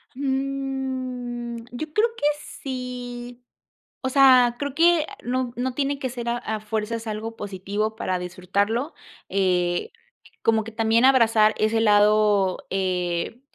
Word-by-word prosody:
Mm, 260 -3 -3
yo 300 +5 -6
creo 435 +7 +3
que - - -6 0.4
sí, 245 -2 -6 0.6
o 260 - -2
sea, 255 -3 +6
creo 285 -1 -3
que 335 -1 +4 0.2
no 250 0 -2
no 250 +1 -2
tiene 280 0 -1
que 260 - -2
ser 240 -1 -5
a 240 0 0
a 220 -2 -4
fuerzas 220 +1 -3
algo 220 +1 -5
positivo 205 +2 -3
para 185 -3 -1
disfrutarlo, 200 - -2 0.3
eh, 180 - 0 0.5
como 220 -1 +2
que 225 - -9
también 225 +1 +2
abrazar 225 -5 +5
ese 220 +1 +2
lado, 210 -2 +3
eh, 180 +2 -1
235 Hz, 130 wpm, -24 LUFS, 210-260 Hz, 0.6 s, sea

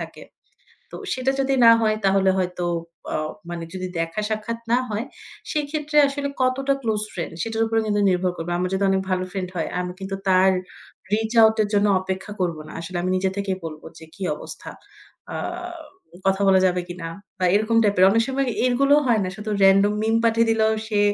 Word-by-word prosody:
থাকে। - - -8 0.7
তো - - -6 0.2
সেটা 260 +1 0
যদি 270 0 +1
না 230 - +10
হয় 215 -1 +2
তাহলে 195 0 +4
হয়তো 180 -1 -2 0.5
অ - - +2 0.3
মানে 170 -1 -5
যদি 185 -1 -4
দেখা 165 +4 -2
সাক্ষাৎ 220 +2 -3
না 245 - +5
হয়, 215 +3 -2 0.5
সেক্ষেত্রে 300 0 -2
আসলে 280 0 -3
কতটা 270 +2 +1
ক্লোজ 220 -3 0
ফ্রেন্ড 170 -2 -5
সেটার 225 0 -1
উপরে 225 0 +1
কিন্তু 205 -1 +1
নির্ভর 180 0 +1
করবে। 165 +1 -4
আমার 180 +1 0
যদি 200 +1 0
অনেক 190 - +2
ভালো 185 0 0
ফ্রেন্ড 185 -2 -4
হয় 160 - -1
আমি 180 0 -4
কিন্তু 195 0 -4
তার 185 +1 +5 0.6
reach 220 +2 0
out 220 0 +6
এর 205 - -2
জন্য 205 +1 +3
অপেক্ষা 190 +2 -5
করব 170 -3 0
না, - - -11
আসলে 175 +2 -6
আমি 185 - -1
নিজে 190 0 0
থেকেই 195 -2 -2
বলব 155 -1 -7 0.2
যে 160 - -12
কি 200 - -11
অবস্থা? - - -9 0.6
আ - - -2 0.9
কথা 195 +1 +2
বলা 190 -1 +5
যাবে 180 0 +1
কিনা? 175 -2 -6 0.3
বা 185 - -1
এরকম 220 +2 +2
টাইপের 200 -3 +4
অনেক 230 +2 +3
সময় 270 0 0 0.2
এর 250 - +3
গুলোও 285 +2 +5
হয় 225 -3 +3
না - - -2
শুধু 215 0 -6
random 195 +2 +5
meme 225 +1 +2
পাঠিয়ে 230 0 +3
দিলেও 220 -1 +3 0.2
সে 210 -2 +1
205 Hz, 195 wpm, -23 LUFS, 185-230 Hz, 0.9 s, না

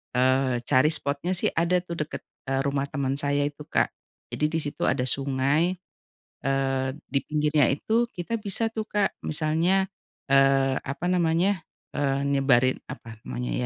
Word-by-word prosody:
eee, 130 -1 +2
cari 130 +1 +4
spotnya 145 +4 0
sih, - - +1
ada 170 +2 +2
tuh 170 -2 -6
deket, - - -7 0.3
eee, 135 0 +1
rumah 140 0 0
teman 135 -2 -1
saya 145 0 +1
itu 145 +1 -8
Kak. - - +2 0.4
Jadi 150 - 0
di 165 - +1
situ 145 - -4
ada 125 - +1
sungai, 140 +6 +1 0.7
eee, 135 -1 +1 0.2
di 140 - +1
pinggirnya 150 -3 +2
itu 225 - +1
kita 180 +6 -3
bisa 210 +2 0
tuh 220 - -2
Kak, 205 -2 0
misalnya, 165 +5 +2 0.5
eee, 135 -1 +4
apa 140 +5 -5
namanya, 175 +2 +2 0.3
eee, 140 -1 +1
nyebarin 130 -2 +3
apa 115 -4 -9
namanya 60 -1 -4
145 Hz, 150 wpm, -26 LUFS, 135-170 Hz, 0.7 s, cari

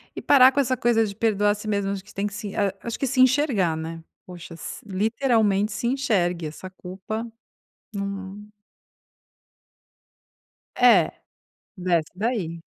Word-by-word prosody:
e - - -5
parar 260 -2 +7
com 285 - -1
essa 260 -2 +1
coisa 230 -1 +2
de 200 -2 -6
perdoar 205 -2 +2
a - - 0
si 210 +1 -9
mesmo, 200 -2 0
acho 195 -1 -5
que - - -17
tem 200 +1 -2
que 205 - -8
se 205 -1 -6
ah, 200 -2 +1
acho 235 - -5
que 275 - 0
se 255 +1 -1
enxergar, 255 - +3
né. 165 +1 -6 0.2
Poxa, 175 -2 -10
si 165 - -8
literalmente 215 0 +1
se 235 - -3
enxergue, 195 - 0
essa 160 +5 -9
culpa, 190 +5 -6 0.6
num 200 0 -6 2.3
É, 225 -10 +5 0.7
desce 175 -3 0
daí. 185 -6 -2
205 Hz, 150 wpm, -24 LUFS, 185-230 Hz, 2.3 s, parar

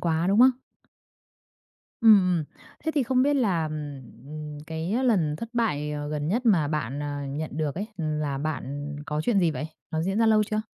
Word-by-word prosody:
quá, 165 -1 +1
đúng 200 - +3
không? 255 +1 +8 1.5
Ừm, 220 -3 +8 0.2
ừm. 160 - -1 0.4
Thế 320 - +1
thì 290 - +3
không 255 +1 +2
biết 290 +2 +3
là, 190 - +1
ừm, 150 0 -7
cái 170 +10 -2
lần 170 -11 +2
thất 230 - -6
bại, 150 -12 0
ờ, 145 0 -4
gần 150 0 -2
nhất 240 +6 0
mà 165 -9 +4
bạn, 145 -2 -2
à, 145 -1 -4
nhận 150 +3 -4
được 155 -2 -1
ấy, 200 +4 -3
là 150 -4 -2
bạn 145 -1 -4
có 150 0 -1
chuyện 205 +5 +2
gì 170 -3 +3
vậy? 155 0 -4 0.2
Nó 160 0 -1
diễn 195 +4 -1
ra 225 - +4
lâu 215 -1 +5
chưa? 215 +1 -1
160 Hz, 195 wpm, -26 LUFS, 150-215 Hz, 1.5 s, không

